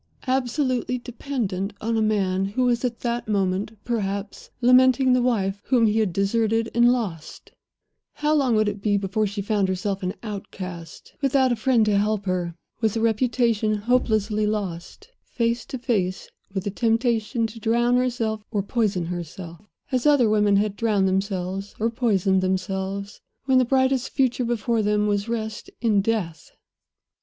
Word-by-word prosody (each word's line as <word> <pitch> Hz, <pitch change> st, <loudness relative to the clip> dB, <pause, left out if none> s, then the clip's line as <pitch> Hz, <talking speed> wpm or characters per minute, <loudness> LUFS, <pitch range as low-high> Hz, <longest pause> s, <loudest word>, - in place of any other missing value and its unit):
Absolutely 255 Hz, -1 st, 0 dB
dependent 235 Hz, -6 st, -4 dB
on 230 Hz, +1 st, -1 dB
a 220 Hz, -, +1 dB
man 195 Hz, -3 st, +1 dB
who 205 Hz, +6 st, -1 dB
was 240 Hz, -1 st, +1 dB
at 240 Hz, -2 st, -2 dB
that 240 Hz, -1 st, -2 dB
moment 200 Hz, +1 st, -1 dB
perhaps 200 Hz, -3 st, -3 dB
lamenting 255 Hz, +1 st, +5 dB
the 250 Hz, -, +3 dB
wife 200 Hz, -5 st, 0 dB
whom 245 Hz, -3 st, +3 dB
he 215 Hz, +1 st, +2 dB
had 210 Hz, -4 st, +1 dB
deserted 225 Hz, +4 st, 0 dB
and 240 Hz, +1 st, +5 dB
lost, 190 Hz, -11 st, -4 dB, 0.6 s
how 300 Hz, +1 st, 0 dB
long 270 Hz, -6 st, +2 dB
would 215 Hz, 0 st, +2 dB
it 205 Hz, -1 st, -3 dB
be 205 Hz, -1 st, +2 dB
before 200 Hz, +2 st, 0 dB
she 200 Hz, 0 st, -4 dB
found 205 Hz, -2 st, +1 dB
herself 190 Hz, +1 st, -2 dB
an 185 Hz, 0 st, -3 dB
outcast, 185 Hz, -5 st, -8 dB
without 270 Hz, -2 st, +3 dB
a -, -, +2 dB
friend 235 Hz, -1 st, +2 dB
to 205 Hz, -1 st, +2 dB
help 210 Hz, -1 st, 0 dB
her 180 Hz, -2 st, -2 dB, 0.2 s
with 220 Hz, -1 st, 0 dB
a -, -, 0 dB
reputation 225 Hz, -1 st, +1 dB
hopelessly 215 Hz, -2 st, +1 dB
lost 205 Hz, -, -4 dB, 0.2 s
face 235 Hz, 0 st, -2 dB
to 260 Hz, -, -5 dB
face 200 Hz, -7 st, -1 dB, 0.2 s
with 190 Hz, -1 st, -3 dB
the 200 Hz, -, -3 dB
temptation 230 Hz, +1 st, +1 dB
to 225 Hz, +1 st, -7 dB
drown 235 Hz, +2 st, +2 dB
herself 235 Hz, -4 st, 0 dB
or 205 Hz, -3 st, -1 dB
poison 205 Hz, -5 st, 0 dB
herself, 170 Hz, 0 st, -7 dB, 0.3 s
as 255 Hz, +1 st, +1 dB
other 285 Hz, -6 st, +5 dB
women 210 Hz, -1 st, +3 dB
had 205 Hz, 0 st, +1 dB
drowned 205 Hz, -4 st, +1 dB
themselves 190 Hz, 0 st, -2 dB
or 225 Hz, +2 st, +1 dB
poisoned 195 Hz, -5 st, +1 dB
themselves, 190 Hz, +2 st, -3 dB, 0.2 s
when 265 Hz, -1 st, +4 dB
the -, -, +4 dB
brightest 260 Hz, 0 st, +1 dB
future 255 Hz, -2 st, +1 dB
before 235 Hz, -1 st, 0 dB
them 210 Hz, 0 st, +1 dB
was 205 Hz, +1 st, 0 dB
rest 220 Hz, -2 st, -4 dB
in 215 Hz, -4 st, +2 dB
death? 195 Hz, -7 st, -2 dB
215 Hz, 160 wpm, -24 LUFS, 195-240 Hz, 0.6 s, lamenting